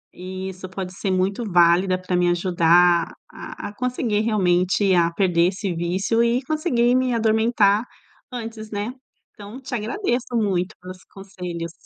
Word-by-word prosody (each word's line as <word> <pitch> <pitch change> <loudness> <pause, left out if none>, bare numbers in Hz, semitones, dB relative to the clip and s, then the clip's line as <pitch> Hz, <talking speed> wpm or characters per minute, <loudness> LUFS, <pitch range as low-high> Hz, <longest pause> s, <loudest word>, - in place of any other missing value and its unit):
isso, 185 0 -7
pode 185 -1 -6
ser 195 +1 -4
muito 190 +5 0
válida 175 +2 +4
para 185 0 -2
me 175 0 +2
ajudar 175 -1 +3 0.2
a - - -9
a - - -6
a 205 - -14
conseguir 240 -3 -1
realmente 190 -2 +2
a 170 -1 +3
perder 175 -1 +2
esse 190 0 -3
vício 190 +7 0
e 235 +2 +1
conseguir 255 -5 +1
me 255 -1 +1
adormentar 220 -2 +2 0.5
antes, 225 -3 -7
né? 205 +3 -3 0.4
Então 210 +5 -10
te 260 -1 -6
agradeço 245 - -2
muito 195 -2 0
pelos 185 0 -10
conselhos. 180 -4 -7
195 Hz, 145 wpm, -22 LUFS, 180-225 Hz, 0.5 s, válida